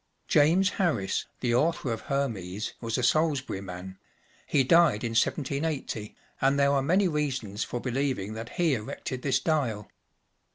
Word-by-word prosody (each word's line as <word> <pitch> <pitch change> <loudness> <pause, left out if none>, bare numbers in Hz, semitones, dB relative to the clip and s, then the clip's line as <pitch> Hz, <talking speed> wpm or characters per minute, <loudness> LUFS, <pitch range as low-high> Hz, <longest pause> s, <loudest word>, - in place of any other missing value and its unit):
James 175 +6 +4
Harris, 120 - 0
the 120 -2 +1
author 150 0 +1
of 110 - -5
Hermes," 110 -8 -3
was 115 0 -2
a 125 - -1
Salisbury 140 -6 +1
man; 95 0 -8 0.5
he 135 - +3
died 160 -6 +4
in 115 - -1
1780, 140 -2 -1 0.3
and 135 +1 +3
there 140 0 +4
are 140 - +3
many 185 +8 +3
reasons 130 - -2
for 120 - -4
believing 125 -5 -2
that 115 +1 -6
he 170 -4 +2
erected 125 +2 -4
this 130 -1 +1
dial. 130 -9 -1
130 Hz, 150 wpm, -28 LUFS, 110-150 Hz, 0.5 s, James